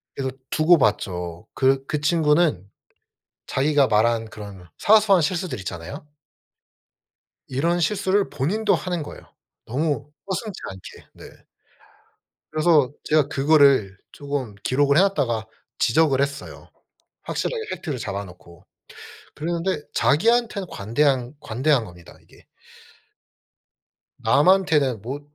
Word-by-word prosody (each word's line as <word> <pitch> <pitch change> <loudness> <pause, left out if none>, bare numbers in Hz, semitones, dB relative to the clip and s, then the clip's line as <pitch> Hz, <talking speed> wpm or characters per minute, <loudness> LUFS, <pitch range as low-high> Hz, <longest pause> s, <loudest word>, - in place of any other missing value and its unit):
그래서 135 -1 -2 0.2
두고 160 +2 +4
봤죠. 90 - -1
그 135 0 +2
그 150 - -2
친구는 150 - +2 0.8
자기가 140 0 +2
말한 115 +1 +1
그런 100 -4 -11
사소한 205 -4 +5
실수들 170 - -2
있잖아요. 90 - -7 1.4
이런 165 +7 0
실수를 195 +3 +1
본인도 200 +10 0
하는 175 -3 -2
거예요. 145 - -9 0.4
너무 145 +2 -2 0.2
서슴지 200 +1 -4
않게. 95 -1 -12
네. - - -15 1.1
그래서 155 -4 +3
제가 150 -2 +2
그거를 140 -9 +3 0.2
쪼금 140 -6 -5
기록을 140 +2 +2
해 - - +7
놓았다가 135 - 0 0.3
지적을 140 +1 +3
했어요. 140 0 -5 0.5
확실하게 470 -2 -3
팩트를 145 -7 -4
잡아 100 -2 -4
놓고. 90 -2 -16 0.7
그랬는데 170 +1 -2
자기한테는 215 +3 +2
관대한 125 +4 0
관대한 130 +1 0
겁니다 85 -2 -14
이게. - - -22 1.8
남한테는 150 - +3
뭐 135 +6 -5
145 Hz, 260 characters per minute, -23 LUFS, 115-170 Hz, 1.8 s, 해